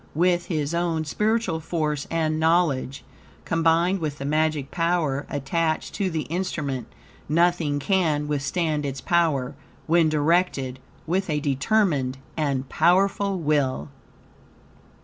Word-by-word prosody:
With 175 Hz, +1 st, +2 dB
his 155 Hz, -2 st, -2 dB
own 170 Hz, -2 st, 0 dB
spiritual 210 Hz, +1 st, 0 dB
force 155 Hz, -3 st, -2 dB
and 155 Hz, -1 st, 0 dB
knowledge, 160 Hz, -5 st, +1 dB, 0.4 s
combined 165 Hz, +3 st, +2 dB
with 150 Hz, -3 st, -3 dB
the 140 Hz, -, -6 dB
magic 155 Hz, -1 st, 0 dB
power 165 Hz, -5 st, 0 dB
attached 155 Hz, +3 st, -1 dB
to 195 Hz, -2 st, -1 dB
the 160 Hz, -3 st, -2 dB
instrument, 155 Hz, -7 st, -3 dB, 0.4 s
nothing 165 Hz, -2 st, +2 dB
can 155 Hz, -2 st, +1 dB
withstand 150 Hz, +2 st, -1 dB
its 135 Hz, -1 st, -3 dB
power, 150 Hz, -6 st, +1 dB, 0.3 s
when 165 Hz, 0 st, +3 dB
directed 150 Hz, -4 st, +1 dB, 0.3 s
with 185 Hz, +3 st, -1 dB
a 150 Hz, -1 st, +1 dB
determined 140 Hz, -1 st, +1 dB, 0.2 s
and 140 Hz, -4 st, -1 dB
powerful 195 Hz, +5 st, +2 dB
will. 145 Hz, -, 0 dB
155 Hz, 115 wpm, -24 LUFS, 145-175 Hz, 0.4 s, when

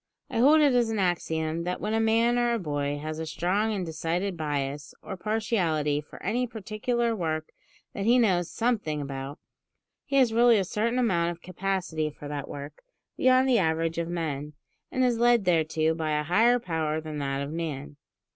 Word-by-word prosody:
I -, -, -1 dB
hold 300 Hz, +6 st, +6 dB
it 285 Hz, -3 st, +4 dB
as 240 Hz, -2 st, +3 dB
an 220 Hz, -, -2 dB
axiom 165 Hz, -3 st, -1 dB
that 180 Hz, +1 st, -3 dB
when 210 Hz, +1 st, -2 dB
a 225 Hz, -, +2 dB
man 230 Hz, +2 st, +3 dB
or 240 Hz, 0 st, +2 dB
a -, -, +1 dB
boy 145 Hz, -6 st, -2 dB
has 155 Hz, +1 st, -5 dB
a 160 Hz, -, -3 dB
strong 190 Hz, +7 st, 0 dB
and 195 Hz, -4 st, -2 dB
decided 170 Hz, +4 st, -2 dB
bias 145 Hz, -2 st, -3 dB
or 190 Hz, -, -6 dB
partiality 180 Hz, -8 st, 0 dB
for 150 Hz, -, -13 dB
any 245 Hz, +6 st, 0 dB
particular 230 Hz, +2 st, -2 dB
work 155 Hz, -4 st, -3 dB, 0.4 s
that 200 Hz, -, -3 dB
he 240 Hz, +3 st, +5 dB
knows 185 Hz, -8 st, +2 dB
something 215 Hz, -11 st, -1 dB
about, 140 Hz, 0 st, -5 dB, 0.7 s
he 275 Hz, -, -2 dB
has 255 Hz, -4 st, +4 dB
really 235 Hz, 0 st, +5 dB
a 195 Hz, -, +2 dB
certain 225 Hz, +6 st, -1 dB
amount 180 Hz, -9 st, +2 dB
of 175 Hz, -1 st, -7 dB
capacity 180 Hz, -4 st, -2 dB
for 145 Hz, 0 st, -10 dB
that 145 Hz, -1 st, -5 dB
work 145 Hz, +1 st, -8 dB, 0.3 s
beyond 255 Hz, +1 st, +4 dB
the 245 Hz, -3 st, +4 dB
average 165 Hz, 0 st, 0 dB
of 170 Hz, -, -2 dB
men, 150 Hz, -4 st, -3 dB, 0.4 s
and 255 Hz, -, +1 dB
is 245 Hz, -2 st, +2 dB
led 240 Hz, -3 st, +4 dB
thereto 160 Hz, -2 st, +2 dB
by 160 Hz, -1 st, -2 dB
a -, -, -1 dB
higher 225 Hz, +10 st, +4 dB
power 160 Hz, -7 st, -2 dB
than 155 Hz, -1 st, -6 dB
that 140 Hz, 0 st, -2 dB
of 140 Hz, -, -5 dB
man. 150 Hz, -4 st, -5 dB
175 Hz, 190 wpm, -27 LUFS, 155-225 Hz, 0.7 s, hold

